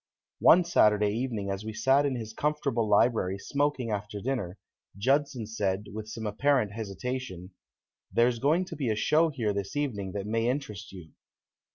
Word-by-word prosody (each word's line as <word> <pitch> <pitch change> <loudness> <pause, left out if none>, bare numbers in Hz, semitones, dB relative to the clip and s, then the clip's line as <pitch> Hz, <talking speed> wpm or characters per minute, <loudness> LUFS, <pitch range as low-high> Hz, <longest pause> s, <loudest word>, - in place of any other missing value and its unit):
One 180 +2 +7
Saturday 105 -11 +3
evening 110 -4 -2
as 100 +1 -4
we 110 0 -5
sat 135 +5 +3
in 135 - -1
his 110 -2 -6
comfortable 140 -6 -1
library 100 -3 +3
smoking 140 +1 -1
after 105 0 -4
dinner, 105 -6 -3 0.4
Judson 130 +1 +1
said, 105 -2 -2
with 110 0 -6
some 110 0 -6
apparent 110 +1 +1
hesitation: 105 -2 -5 0.6
"There's 120 0 +2
going 155 +8 +2
to - - -8
be 135 -5 -2
a 110 - +1
show 155 +9 +3
here 115 -8 -1
this 100 +3 -4
evening 105 -10 -2
that 100 -1 -4
may 115 +2 0
interest 110 -6 -4
you." 90 -5 -11
110 Hz, 165 wpm, -28 LUFS, 105-135 Hz, 0.6 s, One